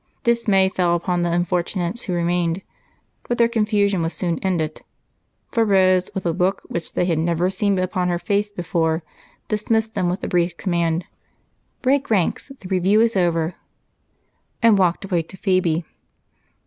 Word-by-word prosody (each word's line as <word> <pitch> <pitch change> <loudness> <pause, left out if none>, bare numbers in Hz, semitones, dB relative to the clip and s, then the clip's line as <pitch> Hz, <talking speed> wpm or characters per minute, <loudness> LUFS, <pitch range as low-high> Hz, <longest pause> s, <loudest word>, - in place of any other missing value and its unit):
Dismay 230 -6 +3
fell 180 -2 +1
upon 175 +1 -1
the 175 0 0
unfortunates 175 +3 -1
who 185 - -3
remained, 175 +1 0 0.7
but 240 - 0
their 235 - +5
confusion 210 -4 +1
was 165 +1 -1
soon 170 -3 -1
ended, 165 -5 -2 0.7
for 230 - +2
Rose, 185 -3 +3
with 190 - -3
a 170 - +2
look 180 +3 0
which 170 -1 -5
they - - +1
had 165 -3 +1
never 170 +2 +1
seen 200 +1 +1
upon 185 0 0
her 175 -1 0
face 205 +3 0
before, 165 -4 -1 0.4
dismissed 220 +1 0
them 185 -4 0
with 180 +3 -2
the - - -3
brief 175 -1 0
command, 170 -2 0 0.8
"Break 275 +2 +2
ranks 210 - 0
the 190 - -8
review 190 +3 +2
is 230 0 +3
over," 170 -2 +1 1.1
and 230 -2 +6
walked 185 -1 +1
away 180 -3 0
to 165 +4 -11
Phebe. 180 -4 +1
185 Hz, 160 wpm, -21 LUFS, 170-200 Hz, 1.1 s, and